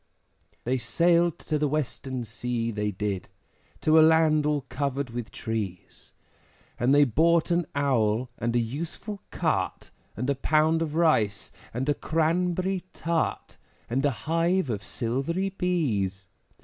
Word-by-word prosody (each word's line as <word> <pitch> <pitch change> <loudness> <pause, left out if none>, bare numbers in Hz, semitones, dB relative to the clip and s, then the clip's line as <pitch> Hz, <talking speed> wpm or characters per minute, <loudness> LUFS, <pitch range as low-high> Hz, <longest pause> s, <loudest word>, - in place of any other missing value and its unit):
They 130 +2 0
sailed 170 +8 +2
to 155 -1 -2
the 150 - +2
Western 130 -3 -3
Sea, 115 +1 -2
they 105 -1 -1
did, 100 -2 -3 0.5
To 155 +1 +5
a - - +8
land 155 -1 +4
all 150 -1 +1
covered 140 -1 -2
with 120 -1 -5
trees, 105 -6 -5 0.7
And 125 +2 +2
they 145 +1 +7
bought 165 +7 +3
an 170 -1 +1
Owl, 125 -4 +1
and 120 +1 -1
a - - +4
useful 165 - -5
Cart, - - -1 0.3
And 125 +4 -2
a 140 - +3
pound 155 +4 +2
of 155 -2 -2
Rice, 115 - +2 0.2
and 125 +4 -3
a 145 - +3
Cranberry 175 +5 0
Tart, 165 -1 -2 0.3
And 135 +3 +1
a 145 - +4 0.2
hive 165 -1 +1
of 105 -2 -3
silvery 135 - -1
Bees. 115 - -1
145 Hz, 140 wpm, -27 LUFS, 115-165 Hz, 0.7 s, a